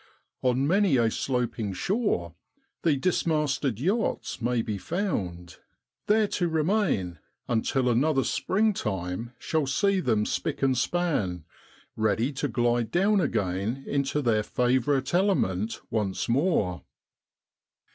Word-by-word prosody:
On 130 +1 +2
many 185 -2 +3
a 115 -2 +2
sloping 120 -6 -2
shore 180 - -1 0.5
the 155 -4 +2
dismasted 150 - 0
yachts 195 - -1
may 120 0 +1
be 105 -2 -3
found, 95 - -3 0.5
there 215 0 +4
to 175 - 0
remain 160 - 0 0.3
until 125 +2 +1
another 135 +3 +2
springtime 115 - -1
shall 155 -3 -1
see 200 +8 +2
them 110 -10 +1
spick 155 +3 -2
and 135 -1 +3
span, 125 - -1 0.5
ready 110 +5 +1
to 135 +2 -2
glide 120 -2 +1
down 195 - +3
again 105 - -1
into 140 +1 -1
their 110 -3 +2
favourite 130 +5 +1
element 115 - +1
once 105 -4 -1
more. 120 - +1
130 Hz, 115 wpm, -27 LUFS, 110-165 Hz, 0.5 s, there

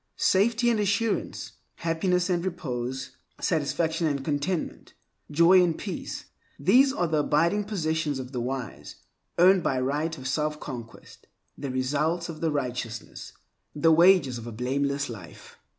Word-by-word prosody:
Safety 235 +5 +3
and 225 - +1
assurance, 210 +2 -1 0.2
happiness 175 +2 0
and 175 -2 0
repose, 130 -7 -4 0.2
satisfaction 160 +1 0
and 140 -3 -2
contentment, 155 +4 -3 0.3
joy 170 +5 +6
and 170 -2 0
peace—these 210 - 0
are 180 - 0
the 155 -2 +1
abiding 170 +8 +2
possessions 160 -7 -1
of 130 -1 -7
the 125 -3 -3
wise, 125 -3 -5 0.4
earned 185 +2 +6
by 130 -5 0
right 150 +5 -1
of 130 - -9
selfconquest, 135 -4 -4 0.4
the 140 - -5
results 150 +7 -1
of 160 -2 -7
righteousness, 125 -7 -3 0.4
the 160 +2 +4
wages 165 -7 +5
of 115 - -9
a - - -5
blameless 140 +4 -1
life. 100 -10 -11
155 Hz, 130 wpm, -26 LUFS, 130-175 Hz, 0.4 s, joy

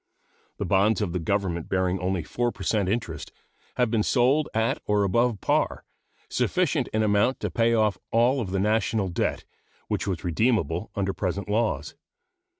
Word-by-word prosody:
The - - -2
bonds 100 +3 +3
of 85 -4 -3
the 90 - -1
Government 85 -1 -1
bearing 95 0 0
only 90 -1 -1
4 120 +8 -1
per - - -9
cent 100 -4 +1
interest 95 -8 -3 0.4
have 125 -3 +1
been 115 -2 +2
sold 135 +7 +2
at 110 +1 0
or 105 -1 +2
above 115 +3 +1
par, - - 0 0.4
sufficient - - 0
in 110 0 0
amount 105 +5 +2
to - - -2
pay 115 0 +2
off 105 -4 +1
all 125 +4 +3
of 100 - -4
the 95 +1 -1
national 105 -1 +1
debt 85 - -2 0.4
which - - -1
was 90 -4 -2
redeemable 90 - 0
under 95 -1 -1
present 95 +2 -3
laws. 110 +3 -1
105 Hz, 165 wpm, -26 LUFS, 95-115 Hz, 0.4 s, bonds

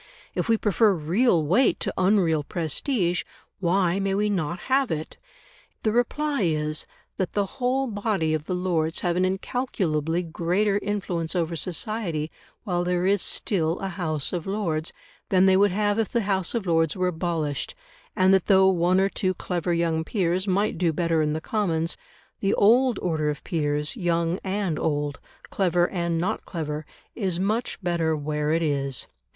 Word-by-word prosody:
If - - -2
we 225 - +4
prefer 210 0 +3
real 170 +2 +2
weight 200 - +3
to - - -2
unreal 185 -5 +3
prestige, 175 - -1 0.4
why 185 0 +2
may 195 0 0
we 210 +1 +1
not 175 -2 -2
have 265 -1 +1
it?" 155 0 -4 0.6
The 215 - +2
reply 280 +4 0
is, 155 -3 0 0.3
that 185 - -2
the 205 -1 +1 0.2
whole 260 +2 +2
body 205 -8 -1
of 155 -1 -2
the 180 - -2
Lords 170 -3 0
have 175 -2 0
an 185 +1 +2
incalculably 185 - -1
greater 180 +5 0
influence 190 -5 -2
over 170 -1 0
society 170 -1 -2 0.3
while 175 -4 -1
there 180 0 0
is 200 0 +3
still 170 -4 0
a 195 - -4
House 160 -5 -2
of 175 -1 -3
Lords, 170 -6 -1 0.4
than 190 -1 +4
they 190 -1 +5
would 200 +2 +5
have 205 +2 +1
if 225 - 0
the 235 - 0
House 195 -1 0
of 225 -4 -1
Lords 165 -3 +2
were 185 0 +1
abolished; 160 -4 -2 0.4
and 185 +1 +4
that 190 -2 +3
though 190 -1 +6
one 180 0 +3
or 195 - +3
two 185 -1 -1
clever 175 0 -2
young 165 -1 +1
peers 185 0 0
might 195 -2 +1
do 175 -2 +2
better 165 0 +1
in 150 -1 +1
the 160 - -3
Commons, 170 -5 0 0.4
the 195 0 +1
old 245 +4 +4
order 155 -4 0
of 150 0 -4
peers, 150 - -1
young 170 -3 0
and 190 -4 -1
old, 145 -2 -1 0.3
clever 175 -2 +2
and 170 -3 -1
not 185 +7 -1
clever, 155 -3 -4 0.3
is 190 -6 -1
much 215 +5 -1
better 170 -2 +1
where 150 0 -1
it 165 +1 +2
is. 140 -4 -1
180 Hz, 170 wpm, -25 LUFS, 160-200 Hz, 0.6 s, though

